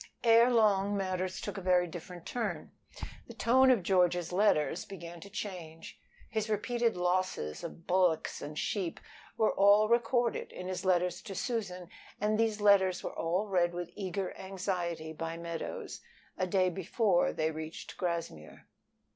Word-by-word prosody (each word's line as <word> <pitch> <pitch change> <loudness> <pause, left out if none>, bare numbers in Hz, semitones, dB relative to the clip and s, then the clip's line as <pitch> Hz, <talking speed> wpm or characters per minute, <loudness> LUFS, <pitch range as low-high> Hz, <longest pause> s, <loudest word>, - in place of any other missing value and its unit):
Ere 230 +1 +6
long 205 -4 +3
matters 185 -1 -2
took - - -5
a - - -8
very 180 -1 +3
different 175 +1 -9
turn. 240 -2 -3 0.6
The - - -11
tone 260 +3 +4
of 240 -8 +4
George's 175 -2 +2
letters 180 -8 +2
began 170 -3 -9
to 200 - -11
change. 180 -6 -7 0.3
His 220 0 -2
repeated 230 +1 0
losses 180 - -1
of 170 0 -8
bullocks 180 -3 +1
and 150 +1 -7
sheep 185 -1 -2 0.4
were 220 - +3
all 205 +2 +5
recorded 235 0 +1
in 180 - -7
his 185 0 -4
letters 180 -1 +1
to 195 - -8
Susan, 190 -7 -3 0.3
and 215 +1 +1
these 220 -2 +1
letters 195 -3 +4
were - - -4
all 175 +5 0
read 175 -4 +1
with 175 -1 -5
eager 190 -1 -4
anxiety 180 -4 -3
by 165 +1 -5
Meadows 170 -1 -6 0.3
a 185 - -1
day 185 0 +2
before 190 +1 +1
they 160 0 -1
reached 160 +1 -7
Grassmere. 165 - -4
185 Hz, 150 wpm, -31 LUFS, 175-210 Hz, 0.6 s, Ere